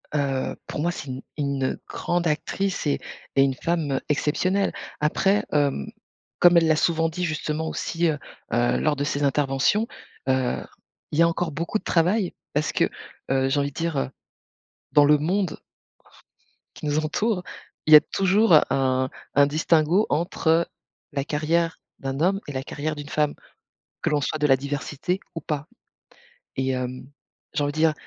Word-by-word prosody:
Heu, 135 -2 0
pour - - -5
moi, 170 +2 +1
c'est 145 - -7
une 130 0 -5 0.2
une, 140 -2 -1
heu, 130 - -2
grande 175 0 -1
actrice 180 +4 -1
et 145 - +1 0.4
et 135 - +5
une 135 -1 +2
femme, 165 +1 -1
heu, 135 - 0
exceptionnelle. 180 +7 +1 0.3
Après, 195 +7 +2
hem, 140 - +1 0.5
comme 175 0 +7
elle 165 -1 +5
l'a 155 - +4
souvent 165 +1 +2
dit, 180 +3 -4
justement 155 0 -2
aussi, 170 +1 -1
heu, 155 -2 +1 0.4
heu, 120 0 +2
lors 155 -1 +2
de 140 - -2
ses 145 0 -1
interventions, 140 - +2 0.4
heu, 130 -1 +1 0.5
il 150 - -1
y - - +7
a 170 - +7
encore 170 0 -1
beaucoup 170 +7 -2
de - - -23
travail 180 +3 +2 0.2
parce 150 +1 0
que, - - +2 0.4
heu, 135 0 +2
j'ai 145 - +1
envie 140 0 0
de - - -27
dire, 165 -3 -1
heu, 135 - 0 0.8
dans 145 -1 +6
le 150 +1 +6
monde 180 +5 -1 1.2
qui - - -7
nous 150 +1 +1
entoure, 180 +5 0 0.4
il 155 - +5
y - - +14
a - - +6
toujours 195 +1 +2 0.2
un 130 -1 +1 0.3
un 140 0 +6
distinguo 160 +5 +3
entre 165 0 +1 0.4
la 140 -2 -1
carrière 160 +3 0 0.2
d'un 135 0 -3
homme 190 +5 +2
et - - -4
la 130 0 -3
carrière 150 +2 -3
d'une 145 -1 -8
femme, 150 -1 +1 0.7
que - - +1
l'on 150 -1 +2
soit 155 +2 -2
de 150 - +2
la 135 -2 +5
diversité 145 +6 -3
ou 165 - -4
pas 150 -1 -3 0.9
et 130 0 0
hem, 130 0 -4 0.4
j'ai 145 - 0
envie 145 - 0
de - - -8
dire, 160 0 +4
150 Hz, 175 wpm, -24 LUFS, 140-170 Hz, 1.2 s, y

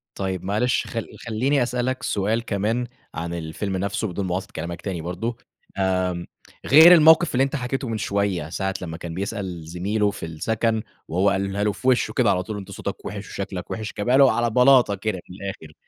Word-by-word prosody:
طيب 95 -2 -3
معلش 110 +6 0
خل 115 -1 -4 0.2
خلّيني 130 +4 +1
أسألك 125 +1 -2
سؤال 110 +4 0
كمان 110 +4 -1 0.3
عن 85 +2 -4
الفيلم 85 +4 -3
نَفْسه 100 +3 -2
بدون 95 +2 -3
مُقاطعة 90 +2 -2
كلامك 85 +2 -5
تاني 90 -5 -4
برضه، 95 +8 -4 0.4
آمم 90 -2 0 0.4
غير 160 +6 +9
الموقِف 160 -1 +6
اللي 135 - +4
أنت 135 +2 -1
حكيته 130 0 -3
من 115 -1 -2
شوية 100 -6 -1
ساعة 95 +2 -2
لمّا 80 -2 -5
كان 85 -1 -7
بيسأل 95 -3 -4
زميله 100 +5 0
في 100 - -7
السَكَن 110 +7 -1 0.3
وهو 95 +4 +2
قالها 100 +1 -1
له 105 - +2
في 130 - -6
وِشّه 125 -2 +3
كده 120 -5 +3
على 90 0 0
طول، 105 +2 -5
"أنت 95 - -8
صوتك - - -6
وِحِش - - -6
وشكلك - - -5
وِحِش." 110 -1 -4
جابها 125 +6 +2
له 135 -2 +7
على 120 0 +1
بلاطة 125 -3 +5
كده 100 -1 -3
من 90 - -10
الآخِر. 95 -6 -7
100 Hz, 190 wpm, -23 LUFS, 90-120 Hz, 0.4 s, غير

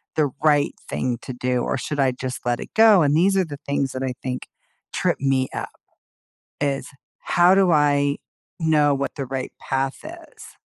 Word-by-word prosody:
the 150 -4 +1
right 145 -2 +3 0.2
thing 125 -2 -1
to 130 - -7
do, 125 0 -1
or - - -1
should 145 +3 -4
I 135 -2 +3
just 125 0 -6
let 120 -1 0
it - - -9
go," 220 -4 +6
and 145 0 +2
these 195 +4 +3
are 190 - +2
the 145 -3 -8
things 140 -1 0
that 130 - -4
I 130 -1 -2
think 125 -1 -4 0.5
trip - - 0
me 135 -1 +1
up, - - -4 0.9
is 140 -1 -1 0.3
how 175 +2 +4
do 190 -3 +4
I 145 -1 +2 0.4
know 150 -3 +3
what 140 0 -3
the 140 - -4
right 130 0 -4
path 135 0 -2
is? 335 +1 -12
140 Hz, 185 wpm, -22 LUFS, 130-155 Hz, 0.9 s, go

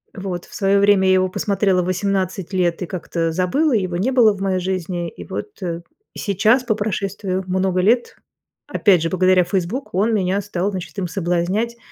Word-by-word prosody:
Вот 185 -3 -5
в - - -18
своё 195 0 +2
время 200 -1 +4
я 185 - +5
его 185 0 +2
посмотрела 195 -1 +1
в - - -3
18 190 0 -1
лет 175 -2 0
и - - -1
как-то 170 -2 -2
забыла, 190 - +1
его 185 -5 0
не 220 +9 0
было 235 -5 +5
в 195 - -9
моей 190 -1 0
жизни. 180 -1 -3
И - - -11
вот - - -5 0.7
сейчас, 215 +5 +2
по 240 -3 +1
прошествию 195 -2 -2
много 185 0 +1
лет, 235 +6 +1 0.5
опять 190 -6 +3
же 165 - 0
благодаря 185 0 +3
"Фейсбук", 190 +8 -3
он 210 +5 +2
меня 195 -1 +1
стал, 200 -1 -2
значит, 175 -5 -7
им 190 -2 -2
соблазнять, 185 +6 -1
190 Hz, 180 wpm, -20 LUFS, 180-205 Hz, 0.7 s, я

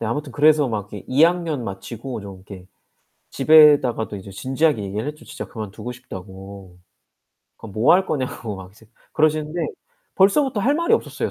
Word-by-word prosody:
네 115 - -2
아무튼 140 +4 -3
그래서 150 +2 +4
막 105 -3 -4
이렇게 105 - -8
2 130 +4 +3
학년 165 -5 +2
마치고 115 +5 -6
좀 100 -1 -9
이렇게 95 -1 -12 0.6
집에다가도 145 -9 +5
이제 100 0 -10
진지하게 130 +5 0
얘기를 105 +6 -4
했죠. 150 +1 -7
진짜 - - -7
그만두고 110 +2 -7
싶다고. 95 -4 -11 0.8
그럼 110 -3 -11
뭐 110 +8 +4
할 190 +1 +3
거냐고 130 -6 -3
막 95 -1 -11
이제 110 +2 -20 0.3
그러시는데 155 +1 0 0.5
벌써부터 210 +5 +3
할 270 +8 +2
말이 335 +8 0
없었어요 - - -3
125 Hz, 375 characters per minute, -21 LUFS, 100-155 Hz, 0.8 s, 집에다가도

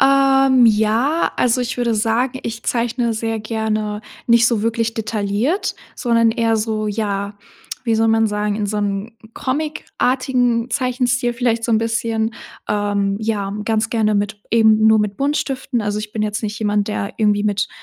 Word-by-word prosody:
Ähm, 270 -2 +5
ja, 225 +8 +2
also, 250 +1 +2
ich 245 +1 -3
würde 240 -2 0
sagen, 230 +4 0
ich 230 0 -5
zeichne 235 0 0
sehr 225 0 -2
gerne 215 -1 -2 0.3
nicht 235 0 +5
so 225 -3 +1
wirklich 230 0 -1
detailliert, 220 - -1 0.2
sondern 230 -3 +2
eher 225 0 +1
so, 215 0 -2
ja, 205 -1 -2 0.5
wie 230 - +1
soll 225 0 +2
man 225 0 +3
sagen, 210 0 -1
in 210 -1 -1
so 210 +1 -2
'nem 205 +2 -2 0.2
comic-artigen 255 -4 -1
Zeichenstil 250 -2 0
vielleicht 235 -1 0
so 235 - -1
'n 220 - +4
bisschen. 225 0 -1 0.3
Ähm, 205 -1 0
ja, 205 -3 -2
ganz 220 0 0
gerne 215 -2 +1
mit 205 +1 -1
eben 220 -1 +4
nur 220 0 +6
mit 210 -1 -1
Buntstiften. 275 -2 -1
Also, 210 0 -2
ich 210 0 -6
bin 215 - -2
jetzt 210 +1 -2
nicht 215 0 -4
jemand, 205 -1 0
der 210 +1 -3
irgendwie 210 -2 +2
mit 205 -1 0
225 Hz, 165 wpm, -19 LUFS, 210-240 Hz, 0.5 s, nur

